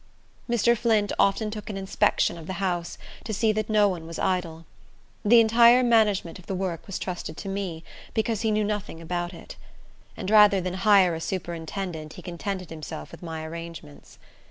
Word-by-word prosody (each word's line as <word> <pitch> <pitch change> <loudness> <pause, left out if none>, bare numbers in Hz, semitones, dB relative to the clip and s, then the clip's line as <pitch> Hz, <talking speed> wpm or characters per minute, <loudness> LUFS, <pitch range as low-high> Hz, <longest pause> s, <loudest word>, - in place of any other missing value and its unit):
Mr. 235 0 +3
Flint 215 -3 +1
often 210 +2 +2
took 210 0 -7
an 200 - -4
inspection 190 -2 +1
of 165 -2 -10
the 190 - -3
house, 175 -2 -2 0.3
to 225 - -5
see 220 +1 +2
that 215 0 -2
no 210 -1 +4
one 175 -4 -4
was 165 - -7
idle. 165 -3 -2 0.6
The 230 +3 +7
entire 235 +2 +6
management 210 -7 +2
of 180 - -17
the 190 - -2
work 180 -4 -4
was 195 - -4
trusted 175 -4 -5
to - - -7
me, 190 -4 -4 0.3
because 220 -1 0
he 225 - +1
knew 215 0 +1
nothing 205 -5 -3
about 175 +1 -3
it; 175 - -11 0.6
and 195 -1 -4
rather 210 -2 +7
than 180 0 -3
hire 190 -2 +4
a 165 - -5
superintendent 170 -2 -5
he - - -11
contented 185 0 -5
himself 155 - -7
with - - -12
my 160 -2 -6
arrangements. 165 - -9
190 Hz, 180 wpm, -26 LUFS, 170-215 Hz, 0.6 s, The